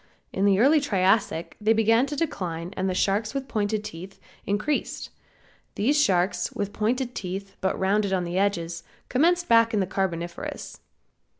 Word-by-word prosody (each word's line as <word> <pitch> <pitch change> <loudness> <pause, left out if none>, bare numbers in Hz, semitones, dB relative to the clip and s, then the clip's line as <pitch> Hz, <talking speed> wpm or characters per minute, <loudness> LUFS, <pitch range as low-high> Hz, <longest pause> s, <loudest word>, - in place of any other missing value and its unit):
In 195 - +1
the 200 -1 +4
early 290 +6 +5
Triassic 195 - +1
they 215 +2 +4
began 225 +4 +3
to 290 - -4
decline 180 - -3
and 190 0 -1
the 185 - -2
sharks, 210 +6 0
with 270 -1 -3
pointed 215 -2 -1
teeth, 185 0 -9 0.3
increased. 210 +9 -2 0.6
These 285 +8 +2
sharks, 180 -6 +1
with 200 0 -3
pointed 245 +3 -1
teeth, 195 0 -6
but 190 - 0
rounded 200 +1 +1
on 185 -2 +1
the 175 +2 -2
edges, 170 -4 -1 0.3
commenced 345 +6 +2
back 230 -1 +4
in - - +2
the 190 - +1
Carboniferous. 175 -2 -4
200 Hz, 160 wpm, -25 LUFS, 185-230 Hz, 0.6 s, early